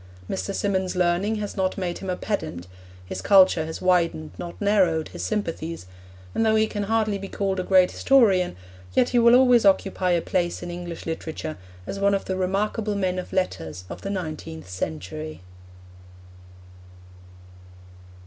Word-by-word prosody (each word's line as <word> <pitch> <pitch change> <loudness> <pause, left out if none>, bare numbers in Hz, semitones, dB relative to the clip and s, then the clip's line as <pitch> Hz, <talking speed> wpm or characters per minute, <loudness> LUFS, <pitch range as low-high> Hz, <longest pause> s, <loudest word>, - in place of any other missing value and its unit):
Mr. 95 0 -3
Symonds' 190 -2 -1
learning 180 +4 +1
has 210 -1 -4
not 190 -1 0
made 180 -3 -3
him 190 - -6
a 180 - 0
pedant; 160 - -4 0.4
his - - -5
culture 185 -5 +5
has 160 - -6
widened 170 - +2
not 175 - -7
narrowed 190 -6 +2
his - - -7
sympathies, 165 - -3 0.5
and - - +1
though 220 -1 +3
he 220 0 +4
can 205 -2 -3
hardly 215 -1 +1
be 195 - -6
called 195 -1 -2
a - - -1
great 185 -1 +4
historian, 205 -10 +3 0.4
yet 250 - +4
he 245 - +3
will 235 +1 +7
always 250 -2 +6
occupy 195 -2 +2
a 175 -1 +3
place 175 0 -1
in 175 - -5
English 175 -1 -7
literature 160 -1 -4 0.3
as 195 - -5
one 200 0 +3
of 195 - -3
the 190 - -2
remarkable 205 +3 -1
men 185 -2 0
of 180 - -7
letters 90 - -2
in - - -5
the 195 - -4
nineteenth 155 - -5
century. 95 - -5
185 Hz, 160 wpm, -24 LUFS, 165-205 Hz, 0.5 s, will